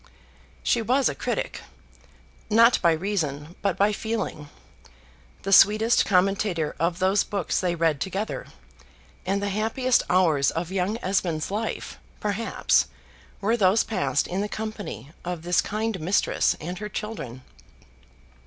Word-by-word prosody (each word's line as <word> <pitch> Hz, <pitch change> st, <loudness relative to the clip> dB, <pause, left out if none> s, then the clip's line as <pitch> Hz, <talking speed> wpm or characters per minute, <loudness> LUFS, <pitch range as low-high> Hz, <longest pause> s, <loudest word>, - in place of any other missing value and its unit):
She 235 Hz, -, +2 dB
was 255 Hz, +4 st, +2 dB
a -, -, -3 dB
critic, -, -, -3 dB, 0.9 s
not 230 Hz, +3 st, +5 dB
by 170 Hz, -, +5 dB
reason 160 Hz, -3 st, -2 dB
but 195 Hz, -2 st, 0 dB
by 205 Hz, +1 st, +3 dB
feeling; 215 Hz, -9 st, -4 dB, 0.9 s
the 195 Hz, -, 0 dB
sweetest 215 Hz, +4 st, +5 dB
commentator 185 Hz, -4 st, +1 dB
of 170 Hz, +1 st, 0 dB
those 190 Hz, +2 st, +2 dB
books 200 Hz, -5 st, -2 dB
they 180 Hz, -2 st, 0 dB
read 160 Hz, -4 st, +1 dB
together; 195 Hz, +3 st, -3 dB, 0.8 s
and 200 Hz, +1 st, 0 dB
the 200 Hz, -, 0 dB
happiest 225 Hz, +5 st, +1 dB
hours 160 Hz, -6 st, +3 dB
of 170 Hz, +2 st, -4 dB
young 195 Hz, +3 st, -1 dB
Esmond's 180 Hz, -4 st, -1 dB
life, 220 Hz, +2 st, -4 dB, 0.2 s
perhaps, 210 Hz, +2 st, +1 dB, 0.5 s
were 220 Hz, +4 st, +2 dB
those 200 Hz, -1 st, +4 dB
passed 145 Hz, -, 0 dB
in 185 Hz, +2 st, -2 dB
the 210 Hz, -, -2 dB
company 205 Hz, -, -6 dB
of 175 Hz, -2 st, -4 dB
this 175 Hz, -1 st, +2 dB
kind 215 Hz, -1 st, -2 dB
mistress 175 Hz, +6 st, +1 dB
and 175 Hz, +3 st, -6 dB
her 210 Hz, 0 st, -5 dB
children. 190 Hz, -, -6 dB
195 Hz, 135 wpm, -25 LUFS, 170-215 Hz, 0.9 s, not